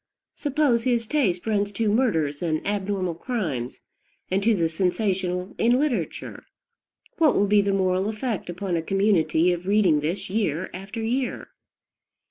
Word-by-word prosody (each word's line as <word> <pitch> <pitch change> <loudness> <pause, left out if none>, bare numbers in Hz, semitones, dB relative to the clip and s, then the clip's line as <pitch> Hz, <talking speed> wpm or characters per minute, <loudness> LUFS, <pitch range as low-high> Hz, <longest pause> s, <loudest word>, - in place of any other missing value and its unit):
Suppose 285 -5 +1
his 235 -1 +1
taste 215 -9 0
runs 205 -2 0
to 225 +2 -1
murders 165 - +1
and 160 -3 -1
abnormal 195 -3 -1
crimes, 165 - -4 0.5
and 190 +1 +2
to 225 +2 +3
the 170 -4 +1
sensational 185 +1 -1
in 240 +2 +4
literature: 245 - -3 0.7
what 315 -4 +4
will 205 - +3
be 205 0 +4
the 200 0 0
moral 190 0 +1
effect 220 -3 -3
upon 180 +1 -3
a 165 - 0
community 180 -2 +2
of 175 +1 -6
reading 195 -7 +4
this 160 +6 -3
year 185 -4 -1
after 195 +5 -6
year? 250 +3 -2
195 Hz, 145 wpm, -24 LUFS, 175-225 Hz, 0.7 s, in